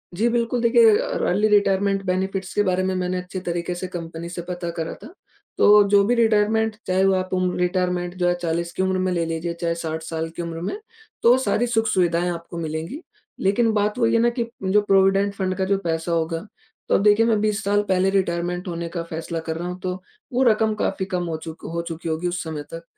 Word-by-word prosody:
जी, 220 Hz, +6 st, +2 dB
बिल्कुल, 235 Hz, 0 st, 0 dB
देखिए 255 Hz, -, +6 dB
अ, -, -, -2 dB
र -, -, -1 dB
early 205 Hz, +4 st, +2 dB
retirement 200 Hz, -1 st, +2 dB
benefits 190 Hz, +1 st, -2 dB
के 205 Hz, -, +3 dB
बारे 185 Hz, -1 st, +1 dB
में 190 Hz, 0 st, 0 dB
मैंने 185 Hz, 0 st, -1 dB
अच्छे 180 Hz, +1 st, -6 dB
तरीके 175 Hz, -1 st, -3 dB
से 185 Hz, +1 st, -5 dB
कंपनी 170 Hz, -1 st, -6 dB
से 175 Hz, 0 st, -5 dB
पता 175 Hz, 0 st, -5 dB
करा 165 Hz, -1 st, -3 dB
था। -, -, -8 dB, 0.5 s
तो 210 Hz, 0 st, +7 dB
जो 200 Hz, 0 st, +5 dB
भी 240 Hz, +4 st, +2 dB
रिटायरमेंट 220 Hz, -1 st, +2 dB
चाहे 185 Hz, +1 st, +2 dB
वो 195 Hz, -, +4 dB
आप 185 Hz, 0 st, -2 dB
उम, 185 Hz, 0 st, +1 dB
रिटायरमेंट 180 Hz, -1 st, 0 dB
जो 175 Hz, -1 st, +1 dB
है 175 Hz, -, +3 dB
40 170 Hz, 0 st, -2 dB
की 190 Hz, -, -1 dB
उम्र 190 Hz, 0 st, +1 dB
में 185 Hz, 0 st, 0 dB
ले 170 Hz, -2 st, 0 dB
लीजिए, 165 Hz, +1 st, -3 dB
चाहे 170 Hz, 0 st, -2 dB
60 160 Hz, -1 st, -4 dB
साल 160 Hz, 0 st, -4 dB
की -, -, -4 dB
उम्र 165 Hz, -1 st, -5 dB
में, 290 Hz, -, -3 dB, 0.4 s
तो 240 Hz, +2 st, +6 dB
सारी 245 Hz, -1 st, +1 dB
सुख-सुविधाएँ 180 Hz, -7 st, +1 dB
आपको 170 Hz, 0 st, -7 dB
मिलेंगी। 160 Hz, -, -4 dB, 0.4 s
लेकिन 220 Hz, +4 st, +2 dB
बात 210 Hz, +1 st, 0 dB
वही 230 Hz, -2 st, +3 dB
है 230 Hz, -, +4 dB
ना, 240 Hz, -, +4 dB
कि 235 Hz, 0 st, -2 dB, 0.2 s
जो 195 Hz, +2 st, +3 dB
प्रोविडेंट 195 Hz, 0 st, +3 dB
फण्ड 185 Hz, -1 st, -1 dB
का 190 Hz, -, 0 dB
जो 195 Hz, +1 st, +2 dB
पैसा 165 Hz, 0 st, -2 dB
होगा, 165 Hz, 0 st, 0 dB, 0.5 s
तो -, -, +4 dB
अब -, -, +2 dB
देखिए 210 Hz, +2 st, +5 dB
मैं 225 Hz, -2 st, +2 dB
20 215 Hz, 0 st, 0 dB
साल 205 Hz, +1 st, +2 dB
पहले 190 Hz, 0 st, +3 dB
रिटायरमेंट 180 Hz, -1 st, -1 dB
होने 170 Hz, -1 st, -4 dB
का 170 Hz, 0 st, -4 dB
फैसला 165 Hz, +1 st, -4 dB
कर 160 Hz, -, -1 dB
रहा 175 Hz, +1 st, -4 dB
हूँ, 180 Hz, +1 st, -6 dB
तो 185 Hz, 0 st, -4 dB, 0.3 s
वो 255 Hz, +2 st, +3 dB
रकम 220 Hz, -2 st, +3 dB
काफ़ी 195 Hz, -2 st, -1 dB
कम 180 Hz, -2 st, -2 dB
हो 160 Hz, -, -2 dB
चूक 160 Hz, 0 st, -9 dB
हो 170 Hz, -, -1 dB
चुकी 165 Hz, 0 st, -5 dB
होगी 160 Hz, +2 st, -1 dB
उस 175 Hz, 0 st, -2 dB
समय 155 Hz, -2 st, -5 dB
तक। 165 Hz, 0 st, -7 dB
185 Hz, 230 wpm, -23 LUFS, 170-205 Hz, 0.5 s, तो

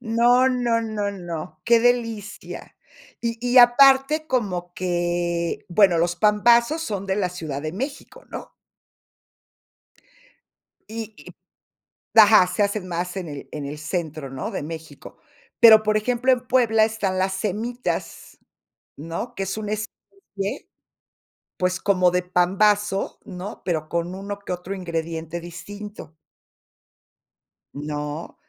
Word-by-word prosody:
No, 245 Hz, +2 st, +3 dB
no, 240 Hz, -2 st, +1 dB
no, 215 Hz, -2 st, -2 dB
no, 175 Hz, -3 st, -7 dB
qué 235 Hz, -1 st, +5 dB
delicia, 230 Hz, -4 st, -2 dB, 0.4 s
y 230 Hz, -1 st, -2 dB
y 245 Hz, +1 st, +4 dB
aparte 270 Hz, +5 st, +6 dB
como 180 Hz, -8 st, -2 dB
que, 175 Hz, -1 st, -1 dB
bueno, 180 Hz, -2 st, +4 dB
los 175 Hz, +1 st, +1 dB
pambazos 235 Hz, -, +3 dB
son 200 Hz, -, -4 dB
de 190 Hz, +1 st, 0 dB
la 185 Hz, -3 st, 0 dB
Ciudad 155 Hz, -6 st, -5 dB
de 155 Hz, +1 st, -4 dB
México, 270 Hz, +9 st, -6 dB
¿no? -, -, -8 dB, 2.4 s
Y 220 Hz, 0 st, -7 dB
y -, -, -14 dB, 0.8 s
Ajá, 210 Hz, -4 st, +8 dB
se 205 Hz, -, 0 dB
hacen 200 Hz, -2 st, -2 dB
más 180 Hz, +2 st, -3 dB
en 180 Hz, -3 st, -4 dB
el, 145 Hz, -2 st, -8 dB
en 150 Hz, -2 st, -5 dB
el 145 Hz, +2 st, -6 dB
centro, 155 Hz, -3 st, -4 dB
¿no? 135 Hz, -, -5 dB
De -, -, -4 dB
México. 160 Hz, -1 st, -9 dB, 0.4 s
Pero, 220 Hz, -2 st, +9 dB
por 215 Hz, 0 st, +2 dB
ejemplo, 250 Hz, +4 st, +1 dB
en 250 Hz, 0 st, 0 dB
Puebla 225 Hz, -4 st, +4 dB
están 210 Hz, -4 st, -2 dB
las 190 Hz, 0 st, 0 dB
cemitas, 220 Hz, +5 st, -4 dB, 0.6 s
¿no? 165 Hz, -, -6 dB
Que 195 Hz, -, -2 dB
es 195 Hz, +2 st, -4 dB
un 215 Hz, -1 st, -5 dB
especie, 215 Hz, -, -6 dB, 0.9 s
pues, 180 Hz, 0 st, 0 dB
como 185 Hz, -3 st, +3 dB
de 180 Hz, 0 st, 0 dB
pambazo, 195 Hz, +3 st, +1 dB
¿no? 190 Hz, +3 st, -7 dB
Pero 155 Hz, -3 st, -2 dB
con 170 Hz, +1 st, -2 dB
uno 200 Hz, +1 st, -6 dB
que 200 Hz, -2 st, -6 dB
otro 180 Hz, +2 st, -6 dB
ingrediente 165 Hz, -2 st, -4 dB
distinto. 190 Hz, +1 st, -9 dB, 1.6 s
¿No? 150 Hz, +2 st, -5 dB
195 Hz, 130 wpm, -23 LUFS, 175-225 Hz, 2.4 s, Pero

